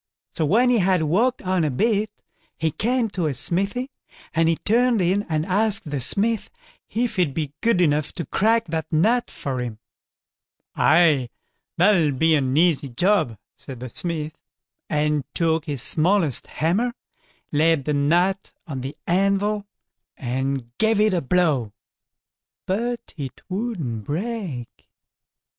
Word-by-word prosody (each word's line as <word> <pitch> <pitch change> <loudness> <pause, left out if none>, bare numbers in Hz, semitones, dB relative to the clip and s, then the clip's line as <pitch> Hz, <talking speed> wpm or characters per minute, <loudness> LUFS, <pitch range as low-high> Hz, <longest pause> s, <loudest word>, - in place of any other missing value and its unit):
So 160 - -1
when 245 - +4
he 240 - +3
had 185 -3 +2
walked 225 +12 +1
on 185 -2 +1
a 155 - +1
bit, 210 - +1 0.5
he 160 -1 0
came 235 - 0
to 175 -5 -1
a 140 - -2
smithy, 200 - 0 0.4
and 165 0 +3
he 165 - +3
turned 235 +5 +2
in 185 +3 +2
and 155 -1 0
asked 200 -3 +1
the 140 -3 -2
smith 215 - +1 0.4
if 235 -1 -1
he'd 170 -7 +1
be 150 -3 -3
good 230 -5 +2
enough 150 -3 +2
to 170 - -5
crack 225 +3 +2
that 160 0 -3
nut 220 +10 +2
for 130 -2 -4
him. 120 -3 -5 1.0
"Aye, 155 -6 +4 0.5
that'll 170 -5 +4
be 160 +5 +3
an 135 -2 +1
easy 160 -5 +3
job", 155 - +1 0.2
said 130 -3 -10
the 125 +1 -6
smith, 155 +1 -4 0.5
and 150 -1 +1
took 160 -1 +1
his 140 -6 -2
smallest 165 - +2
hammer, 210 +10 0 0.6
laid 155 -1 +2
the 150 - 0
nut 175 +7 +1
on 140 -6 -5
the 135 +4 -6
anvil, 200 +3 +1 0.5
and 130 -1 -3
gave 220 -1 +3
it 215 -1 +3
a 175 - +1
blow, 140 -8 +1 0.9
but 235 +5 -3
it 135 -4 -6
wouldn't 180 - -3
break. 175 - -5
170 Hz, 145 wpm, -23 LUFS, 145-205 Hz, 1.0 s, when